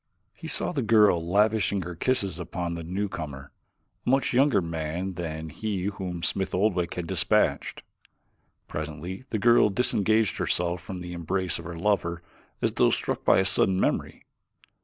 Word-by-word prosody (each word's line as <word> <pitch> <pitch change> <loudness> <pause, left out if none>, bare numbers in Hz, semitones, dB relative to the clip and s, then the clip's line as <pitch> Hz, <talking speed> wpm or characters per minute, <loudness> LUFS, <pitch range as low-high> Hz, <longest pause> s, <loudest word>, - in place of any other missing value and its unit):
He - - -9
saw - - 0
the 150 -6 -1
girl 105 -7 +4
lavishing 100 +2 +2
her 90 +1 -6
kisses 95 -2 -1
upon 85 0 -4
the 85 - -5
newcomer, 80 -7 -4 0.5
a - - -2
much 135 +1 +2
younger 135 -1 +4
man 85 +2 -3
than 80 -2 -5
he 100 0 -3
whom 95 -4 -4
Smith 95 -2 -1
Oldwick 90 -3 +1
had 90 - -3
dispatched. - - +1 0.8
Presently 80 - -6
the 110 - -1
girl 120 0 +5
disengaged 110 0 +2
herself 85 0 0
from 95 0 -7
the 90 0 -6
embrace 90 +2 -1
of 85 - -9
her 85 -1 -6
lover 85 -3 0 0.4
as - - +3
though - - +3
struck - - -2
by - - +5
a 95 - +3
sudden 95 0 +2
memory. - - -1
90 Hz, 160 wpm, -27 LUFS, 85-105 Hz, 0.8 s, girl